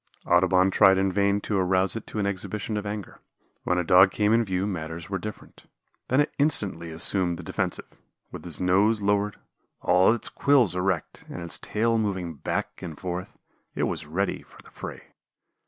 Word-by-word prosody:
Audubon 95 +2 +4
tried 95 -1 +6
in 95 0 +1
vain 100 +1 +2
to 100 -1 -1
arouse 95 +2 +2
it 115 - -6
to - - -7
an 105 - 0
exhibition 100 +2 -3
of 105 0 -3
anger. 105 -2 -6 0.5
When 90 - +1
a 90 - +1
Dog 90 +3 +6
came 105 +2 +1
in 115 +1 +4
view 95 -2 -1
matters 80 -3 -5
were 95 - -1
different. 105 +3 -9 0.4
Then 130 - +2
it 145 - -2
instantly 100 - +1
assumed 85 +2 -1
the 90 - -8
defensive. - - -2 0.5
With - - -8
its 85 -3 -2
nose 100 +4 +2
lowered, 100 +1 +1 0.4
all 90 +3 +4
its 120 - -2
quills 130 -10 +3
erect, 90 -2 -2
and 90 - -6
its 85 -3 -1
tail 115 +1 0
moving 95 -6 -2
back 70 - -4
and 80 -4 -7
forth, 90 0 -5 0.4
it - - -1
was 75 - -2
ready 95 +5 -1
for - - -19
the - - -17
fray. - - -9
95 Hz, 185 wpm, -26 LUFS, 90-105 Hz, 0.5 s, tried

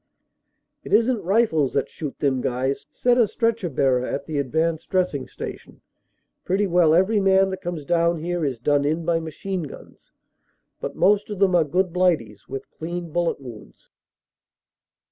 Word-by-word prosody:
"It - - -6
isn 235 +2 +4
t - - -7
rifles 185 - +2
that - - 0
shoot 150 -4 -7
them 135 -3 0
guys," 130 +3 -2
said 245 0 +2
a 230 - +5
stretcher 230 -4 -1
bearer 130 -3 +1
at 140 +2 -3
the 150 -2 -2
Advanced 160 +4 -1
Dressing 180 -8 0
Station. - - -9 0.6
"Pretty 195 +3 +1
well 170 -4 +4
every 195 +5 +3
man 195 0 +4
that 190 0 -5
comes 170 -5 -5
down 170 +1 +2
here 175 +1 -2
is 135 -4 -1
done 145 +4 +1
in 160 +3 -1
by 170 -1 +2
machine 170 +4 -4
guns. 150 - -11 0.7
But - - -5
most 205 +2 +3
of 205 - -4
them 190 -1 +3
are 175 -2 +5
good 180 +4 0
blighties, 155 - 0
with 135 0 -6
clean 170 +1 -6
bullet 175 -1 0
wounds." 115 - -12
170 Hz, 165 wpm, -23 LUFS, 145-190 Hz, 0.7 s, a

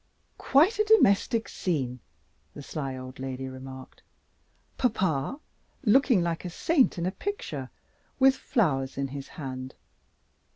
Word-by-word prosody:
"Quite 345 - +4
a - - +5
domestic 230 - +4
scene!" 130 -8 -2 0.6
the 145 - -8
sly 135 -3 -4
old 130 +1 -9
lady 130 0 -4
remarked. 130 0 -10 0.7
"Papa, 190 - 0 0.4
looking 240 -4 +4
like 170 -1 -2
a 180 - -4
saint 270 - +2
in 170 - -2
a 185 - 0
picture, 160 - -5 0.5
with 270 0 +5
flowers 135 - 0
in 135 0 -1
his 140 0 -7
hand. 130 -3 -7
160 Hz, 125 wpm, -27 LUFS, -, 0.7 s, a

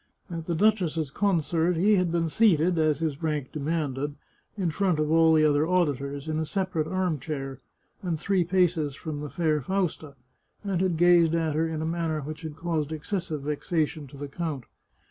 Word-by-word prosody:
At 165 -1 -5
the 170 - 0
duchess's 165 -7 +1
con 195 -3 +2
cert 170 +3 +1
he 205 +6 +4
had 180 -2 +1
been 165 -1 +1
seated, 175 -2 +3
as 155 -2 +3
his 155 -2 -3
rank 150 -4 -2
demanded, 145 -2 -2 0.4
in 180 -5 0
front 180 +1 +1
of 155 0 0
all 165 0 +5
the 155 -1 +5
other 150 +1 +3
auditors, 145 -5 0
in 155 0 -1
a 160 - -1
separate 185 -5 -1
arm 185 -5 -1
chair, 135 -3 -5 0.4
and 170 -4 -2
three 190 0 +1
paces 170 -5 +1
from 155 -1 -5
the 150 0 -5
fair 155 -2 0
Fausta, 160 -3 -2 0.5
and 195 -3 -1
had 185 -3 +1
gazed 170 -1 +5
at 160 -2 0
her 160 +2 +1
in 160 -1 -3
a - - -2
man 165 0 -1
ner 155 -1 -1
which 155 +2 -7
had 155 -2 -6
caused 160 -2 -2
excessive 160 -1 -3
vexation 150 0 -1
to 140 - -13
the 145 +1 -5
count. 145 -2 -4
160 Hz, 195 wpm, -27 LUFS, 150-175 Hz, 0.5 s, all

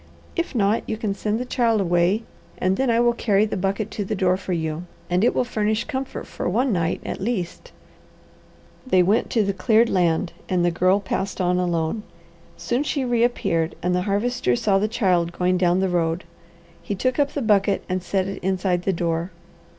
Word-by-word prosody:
If 340 -5 -2
not, 210 0 +2
you 220 - -1
can 210 -2 -2
send 210 +2 -2
the 250 - -3
child 235 -3 +1
away, 180 +3 +2 0.3
and 185 +1 +1
then 265 +4 0
I 230 0 +3
will 240 0 +4
carry 210 -3 +2
the 215 - -3
bucket 195 +3 -2
to 205 - -3
the 195 - -3
door 185 -1 +2
for 190 0 -6
you, 160 0 -2 0.3
and 180 +3 +2
it 240 - +3
will - - +2
furnish 220 -2 0
comfort 265 -2 -5
for - - -4
one 240 +5 +1
night, 170 -2 0
at - - -4
least." 195 -5 -3 1.2
They 185 -7 +4
went 205 +6 +2
to 225 - +2
the 200 0 0
cleared 220 +4 +3
land 170 -1 +1 0.2
and 180 -2 +2
the 175 - +3
Girl 185 +3 +3
passed 195 0 -3
on 180 0 +2
alone. 170 +3 -1 0.6
Soon 245 +3 -1
she 280 -2 -1
reappeared 235 -9 +1
and 180 +1 +1
the 180 - +1
Harvester 205 - +1
saw 195 - +2
the 210 - +1
child 180 -6 +1
going 180 +1 +1
down 180 +1 +3
the 190 - +2
road. 170 -1 0 0.6
He 205 - -3
took 255 +7 -1
up 285 0 +1
the 285 - -2
bucket 200 -2 +2
and 185 0 -1
set 190 +1 -1
it 195 - -6
inside 185 -1 0
the 195 - +2
door. 170 0 -1
195 Hz, 200 wpm, -23 LUFS, 180-225 Hz, 1.2 s, will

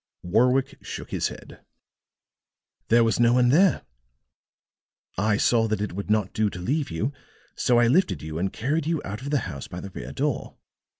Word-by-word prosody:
Warwick 125 +8 +2
shook - - -7
his - - 0
head. - - -11 1.3
"There 115 +1 +5
was 115 0 +1
no 120 0 +5
one 125 -1 +4
there. 175 +7 +4 1.3
I 105 0 +1
saw 115 0 +3
that 110 -1 -1
it 105 -3 -3
would 100 +3 -5
not 105 -3 +1
do 110 -1 +1
to 90 - -8
leave 140 - -1
you, 105 - -2 0.4
so 120 - +2
I 120 - +5
lifted 130 - +2
you 80 +1 -5
and 95 +2 -1
carried 145 +6 -1
you 165 -2 0
out 105 +4 -5
of 140 - -5
the 145 -3 +1
house 70 -8 -6
by 90 - -7
the 100 +1 -8
rear 65 -6 -7
door. - - -2
115 Hz, 185 wpm, -25 LUFS, 100-130 Hz, 1.3 s, There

